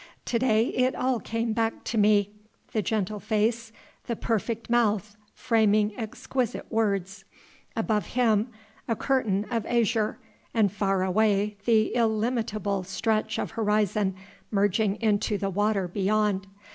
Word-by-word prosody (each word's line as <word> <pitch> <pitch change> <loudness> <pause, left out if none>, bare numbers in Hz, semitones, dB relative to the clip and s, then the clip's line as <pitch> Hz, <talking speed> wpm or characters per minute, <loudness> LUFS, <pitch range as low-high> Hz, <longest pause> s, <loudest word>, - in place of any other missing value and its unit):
To 235 - 0
day 225 -2 +3
it 255 +1 +1
all 255 -2 0
came 230 0 -2
back 225 0 -1
to - - -4
me, 205 -1 +4 0.4
the 215 - 0
gentle 210 +1 -1
face, 225 +2 0 0.3
the 235 - -2
perfect 225 +1 -2
mouth 215 -4 +1 0.2
framing 215 -3 +2
exquisite 245 +1 -3
words. 200 -3 -1 0.5
Above 220 -2 0
Him 225 -3 +2 0.4
a 230 - +1
curtain 215 -6 0
of 230 -2 0
azure, 230 -2 +1 0.4
and 210 -4 +3
far 195 -2 0
away, 205 +1 +2
the 220 -2 +3
illimitable 220 -3 0
stretch 215 +3 -1
of - - -3
horizon 210 -3 +1 0.3
merging 205 0 +1
into 210 -1 +1
the 195 -1 -2
water 205 -1 +1
beyond. 200 +1 0
215 Hz, 130 wpm, -27 LUFS, 205-230 Hz, 0.5 s, me